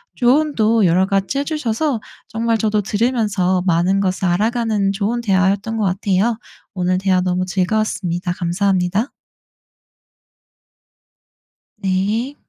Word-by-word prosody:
조언도 240 -5 +2
여러 180 +2 +3
가지 195 +6 -1
해주셔서 285 -3 -1 0.3
정말 230 0 0
저도 215 -1 +1
들으면서 205 -4 0
많은 180 +3 +2
것을 190 -1 -1
알아가는 215 +1 0
좋은 220 +4 -1
대화였던 195 +2 +1
거 215 - 0
같아요. 195 +4 0 0.4
오늘 185 -1 0
대화 185 -1 +1
너무 180 0 0
즐거웠습니다. 185 -1 -1
감사합니다. 185 +4 0 2.8
네. 210 +9 -1
200 Hz, 265 characters per minute, -19 LUFS, 185-225 Hz, 2.8 s, 여러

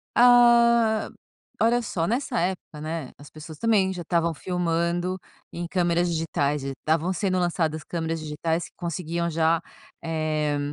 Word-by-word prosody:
Ah, 235 -2 +5 0.5
olha 235 +2 +3
só! 175 -7 -2
Nessa 245 +1 -1
época, 175 -4 -3
né, 155 -3 -4
as 145 - -13
pessoas 155 0 -11
também 205 -4 +2
já 180 - -6
estavam 170 0 0
filmando 175 +1 -1 0.3
em 170 0 -5
câmeras 175 -1 +1
digitais 150 -3 -1
e 140 - -3
estavam 160 +6 -1
sendo 185 0 0
lançadas 165 -3 -1
câmeras 165 -1 -3
digitais 160 +2 -2
que - - -16
conseguiam 170 0 -3
já, 165 0 +2 0.4
eh, 155 -2 -1
170 Hz, 140 wpm, -25 LUFS, 160-185 Hz, 0.5 s, Ah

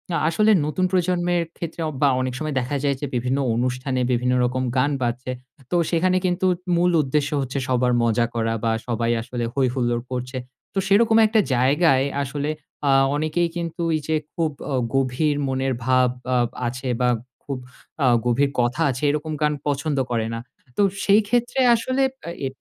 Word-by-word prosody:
আ - - +2
আসলে 215 +6 +3
নতুন 170 +5 0
প্রজন্মের 175 -1 +1
ক্ষেত্রে 170 0 -5
অ - - -1
বা 145 - +5
অনেক 130 -1 -2
সময় 155 -2 -3
দেখা 130 +3 -3
যায় 140 -1 +2
যে, - - -1
বিভিন্ন 125 +3 0 0.2
অনুষ্ঠানে 125 +2 -1
বিভিন্ন 125 +1 +1
রকম 130 +1 -1
গান 140 +3 +3
বাড়ছে। 125 +1 -2 0.4
তো - - +1 0.2
সেখানে 180 +2 +2
কিন্তু 180 +1 0 0.3
মূল 175 +1 +3
উদ্দেশ্য 145 +1 0
হচ্ছে 135 +1 -4
সবার 125 -1 +2
মজা 115 0 +2
করা 115 -1 0
বা, 115 - +2 0.2
সবাই 115 0 0
আসলে 120 +1 -4
হৈ 135 -1 +2
হুল্লোড় 120 -2 0
করছে। 125 +1 -4 0.4
তো 195 - 0
সেরকম 220 +3 +4
একটা 220 +1 +2 0.2
জায়গায় 135 +2 +3 0.2
আসলে 145 +2 -3 0.4
আ - - +5 0.2
অনেকেই 155 +3 0
কিন্তু 170 0 -4 0.2
এইযে 155 +1 -2 0.2
খুব 160 -2 0 0.2
অ - - -1 0.2
গভীর 135 +3 +1
মনের 130 0 0
ভাব 130 -1 +4 0.3
আ - - +4 0.3
আছে 125 +2 -5
বা, 125 - +3 0.3
খুব 140 -2 -4 0.5
আ - - +5 0.2
গভীর 130 +4 +2
কথা 125 +6 -1
আছে, 130 +2 -4
এরকম 150 +2 -2
গান 150 0 +2
পছন্দ 145 +1 -1
করে 115 -2 0
না। 115 - -3 0.4
তো - - +3 0.2
সেইক্ষেত্রে 220 +5 +2 0.2
আসলে 255 +4 0 0.2
আ - - -3 0.2
এ - - +1
140 Hz, 175 wpm, -23 LUFS, 125-170 Hz, 0.5 s, বা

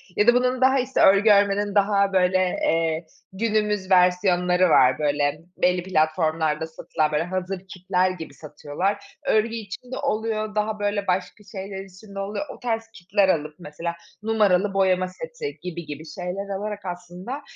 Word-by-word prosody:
ya 210 - +2
da 240 - +8
bunun, 250 +1 +1 0.2
işte, 260 +1 -1
örgü 200 +3 +6
örmenin 200 0 +3
daha, 200 -1 +3
böyle, 185 0 +3 0.3
eee, 165 0 +1 0.3
günümüz 210 -2 0
versiyonları 180 0 +4
var. 130 -1 +5
Böyle, 145 0 0 0.2
belli 180 0 +2
platformlarda 160 -2 +1
satılan, 155 -1 -2
böyle, 150 +2 +1
hazır 185 +1 -3
kitler 185 0 0
gibi 165 -5 -8
satıyorlar. 155 +7 -4
Örgü 225 +1 +2
için 225 +3 -8
de 260 - -3
oluyor, 215 -5 -2
daha, 215 0 -1
böyle, 205 -1 -1
başka 180 +3 -2
şeyler 195 -1 -6
için 195 +2 -15
de - - -4
oluyor. 205 +9 -3
O - - -18
tarz 225 -2 -1
kitler 190 +2 +1
alıp 150 -3 0
mesela 170 +1 -5 0.3
numaralı 205 -3 +2
boyama 185 -1 +2
seti 470 - -7
gibi 170 -2 -6
gibi 150 +1 -7
şeyler 180 +5 -5
alarak 205 -2 -5
aslında 180 +9 -6
190 Hz, 155 wpm, -24 LUFS, 175-210 Hz, 0.3 s, da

